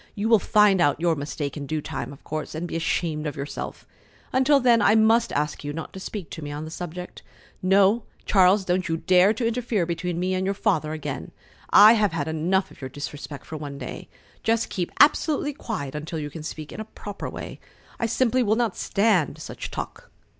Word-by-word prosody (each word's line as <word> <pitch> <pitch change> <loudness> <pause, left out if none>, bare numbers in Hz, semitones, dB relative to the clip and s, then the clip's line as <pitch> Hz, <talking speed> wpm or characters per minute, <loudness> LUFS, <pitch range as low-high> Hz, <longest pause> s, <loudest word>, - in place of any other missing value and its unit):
You 215 +1 -1
will 225 -2 +6
find 205 -2 +4
out 145 -1 +3
your 170 -1 +2
mistake 145 0 -4
in 145 -2 -6
due 155 +1 -1
time, - - -5
of 140 - -13
course, 155 0 -5
and 170 +2 -3
be - - -6
ashamed 160 -2 -1
of 150 - -4
yourself. 140 0 -6 0.5
Until 265 +2 +4
then 240 -3 +4
I 210 +1 +5
must 225 +1 +4
ask 150 +1 -1
you 145 0 -4
not 160 +1 -6
to 190 - -7
speak 190 -2 -6
to 160 - -7
me 145 - -5
on 150 +2 -5
the 160 - -8
subject. 180 +1 -7 0.4
No, 195 +4 +4 0.2
Charles, 190 0 +4
don't 180 0 0
you 165 - 0
dare 185 +4 +4
to 230 - -2
interfere 230 -5 0
between 170 0 -3
me 185 +1 0
and 185 0 0
your 195 +1 0
Father 160 -8 0
again. 150 -3 -5 0.4
I 210 +2 +9
have 210 -6 +2
had 165 - -2
enough 180 +5 0
of - - -16
your 130 - -5
disrespect 145 +1 -7
for 160 - -6
one 145 -2 -7
day. - - -7 0.3
Just 225 0 +1
keep 175 -2 -3
absolutely 295 0 +4
quiet 160 - -5
until 155 +2 -5
you 145 -1 -4
can 160 - -8
speak 155 0 -7
in - - -8
a 220 - -4
proper 205 -2 -7
way. - - -8 0.4
I 230 - +1
simply 255 +2 +2
will 215 -2 +2
not 230 -4 0
stand 195 -7 +1
such - - -7
talk." - - -7
180 Hz, 210 wpm, -25 LUFS, 155-215 Hz, 0.5 s, I